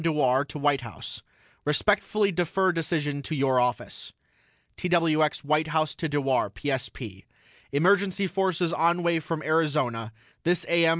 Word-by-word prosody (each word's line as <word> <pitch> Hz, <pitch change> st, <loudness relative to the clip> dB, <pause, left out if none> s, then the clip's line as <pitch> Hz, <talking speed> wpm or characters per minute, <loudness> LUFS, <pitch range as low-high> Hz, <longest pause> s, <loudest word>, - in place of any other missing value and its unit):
DEWAR 140 Hz, -5 st, +2 dB
TO 145 Hz, -, -8 dB
WHITE 145 Hz, -2 st, +2 dB
HOUSE: 115 Hz, -5 st, -8 dB, 0.4 s
RESPECTFULLY 205 Hz, +6 st, +2 dB
DEFER 180 Hz, +2 st, +1 dB
DECISION 150 Hz, -4 st, -1 dB
TO 155 Hz, -, -4 dB
YOUR 135 Hz, -2 st, +2 dB
OFFICE 125 Hz, 0 st, -2 dB, 0.6 s
TWX 165 Hz, -4 st, +1 dB
WHITE 155 Hz, +2 st, +1 dB
HOUSE 155 Hz, -1 st, 0 dB
TO 160 Hz, -, -3 dB
DEWAR 135 Hz, -3 st, +1 dB
PSP: 125 Hz, -7 st, -5 dB, 0.5 s
EMERGENCY 195 Hz, +5 st, +2 dB
FORCES 180 Hz, -2 st, 0 dB
ON 170 Hz, +2 st, +2 dB
WAY 170 Hz, -1 st, +2 dB
FROM 155 Hz, 0 st, -4 dB
ARIZONA 145 Hz, -8 st, 0 dB, 0.3 s
THIS 175 Hz, +1 st, +2 dB
A.M. 170 Hz, -1 st, +4 dB
155 Hz, 130 wpm, -26 LUFS, 140-170 Hz, 0.6 s, A.M